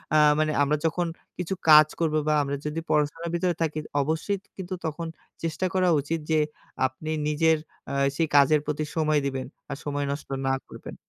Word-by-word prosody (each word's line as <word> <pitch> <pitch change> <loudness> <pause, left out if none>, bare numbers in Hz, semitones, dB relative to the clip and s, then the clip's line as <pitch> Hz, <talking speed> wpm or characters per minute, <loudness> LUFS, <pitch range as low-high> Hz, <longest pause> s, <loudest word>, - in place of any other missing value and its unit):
আ - - +7 0.2
মানে 155 0 +2
আমরা 150 +2 +2
যখন 170 +2 +1 0.3
কিছু 180 +1 -2 0.2
কাজ 155 0 +9
করব 160 -2 +1
বা 155 - +3
আমরা 140 0 -2
যদি 150 +2 -2
পড়াশোনার 150 +3 0
ভিতরে 175 0 +1
থাকি, 155 -1 0 0.2
অবশ্যই 160 +7 -1
ত - - -33
কিন্তু 185 0 -5
তখন 160 +1 -3 0.4
চেষ্টা 165 +3 -1
করা 185 -1 +3
উচিত 165 +4 -2
যে 155 - +4 0.5
আপনি 130 +4 -4 0.2
নিজের 160 +1 +3 0.3
আ - - -3 0.2
সেই 165 0 +1
কাজের 145 +2 +6
প্রতি 150 0 -1
সময় 155 -2 +2
দিবেন 135 -1 -2 0.2
আর 140 - -4
সময় 145 -1 -1
নষ্ট 140 0 -6 0.2
না 135 - +2 0.2
করবেন। - - -9
155 Hz, 185 wpm, -26 LUFS, 145-165 Hz, 0.5 s, কাজ